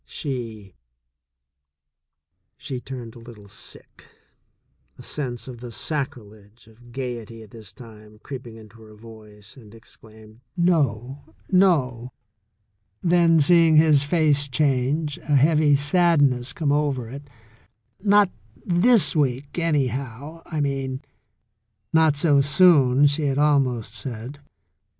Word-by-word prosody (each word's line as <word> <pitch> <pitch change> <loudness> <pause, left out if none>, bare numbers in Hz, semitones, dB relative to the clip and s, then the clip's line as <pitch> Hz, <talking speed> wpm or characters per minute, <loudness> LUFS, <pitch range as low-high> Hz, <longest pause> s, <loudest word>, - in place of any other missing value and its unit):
She 115 - -6 2.1
turned 125 -4 -8
a - - -12
little 115 -3 -14
sick, 100 - -12 0.9
a - - -12
sense 125 -5 -5
of 125 -2 -9
the 120 0 -9
sacrilege 115 -7 -6
of 120 +2 -19
gaiety 120 -3 -7
at 105 - -17
this 110 -5 -11
time 110 -3 -15
creeping 120 -1 -9
into 110 0 -16
her 110 -1 -15
voice, 105 -2 -14
and 115 -5 -16
exclaimed: 110 -1 -16 0.2
"No, 140 - -1 0.2
no!" 130 -11 +1 0.9
Then 170 -2 +3
seeing 165 +1 +4
his 155 -2 +5
face 145 -2 +1
change, 140 +2 -1
a 150 - -1
heavy 150 +1 +4
sadness 145 -4 +2
come 150 -2 -2
over 145 -5 -1
it, 140 +4 -10 0.7
"Not 205 -2 +4 0.3
this 195 +5 +3
week, 140 +1 -1
anyhow, 140 -1 -3
I 155 -3 -3
mean" 135 -1 -3 0.9
("Not 160 -2 +4
so 145 -1 +3
soon,'* 145 -3 +4
she 145 +1 +1
had 135 -1 -1
almost 130 -7 +1
said). 120 +4 -7
135 Hz, 115 wpm, -23 LUFS, 115-150 Hz, 2.1 s, his